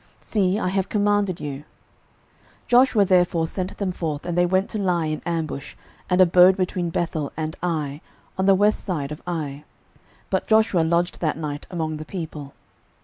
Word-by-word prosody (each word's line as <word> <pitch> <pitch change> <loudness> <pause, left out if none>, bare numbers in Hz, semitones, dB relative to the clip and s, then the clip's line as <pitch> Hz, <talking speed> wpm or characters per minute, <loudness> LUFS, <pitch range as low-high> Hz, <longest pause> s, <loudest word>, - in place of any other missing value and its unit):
See, 195 -2 0
I 185 - -1
have 190 0 -1
commanded 205 -3 +1
you. 140 -2 -4
06:008:009 - - -15 1.0
Joshua 245 -4 +5
therefore 175 -3 +3
sent 185 +3 -4
them 195 -3 -1
forth: 155 -4 -4
and 175 -1 -2
they 175 0 +3
went 185 +2 +1
to 215 - -3
lie 180 -4 +1
in 155 0 -3
ambush, 160 -4 -3 0.3
and 180 0 +2
abode 180 +1 +6
between 180 -2 -1
Bethel 165 -3 -2
and 155 0 -3
Ai, 155 -4 -2 0.3
on 190 +1 0
the 195 - +6
west 210 +2 +2
side 150 -7 -3
of 150 - -7
Ai: 150 -4 -4 0.7
but - - 0
Joshua 220 -4 +3
lodged 170 +2 0
that 155 -3 0
night 150 -2 -5
among 160 -4 -3
the 155 - -7
people. 155 -6 -7
175 Hz, 175 wpm, -23 LUFS, 155-190 Hz, 1.0 s, abode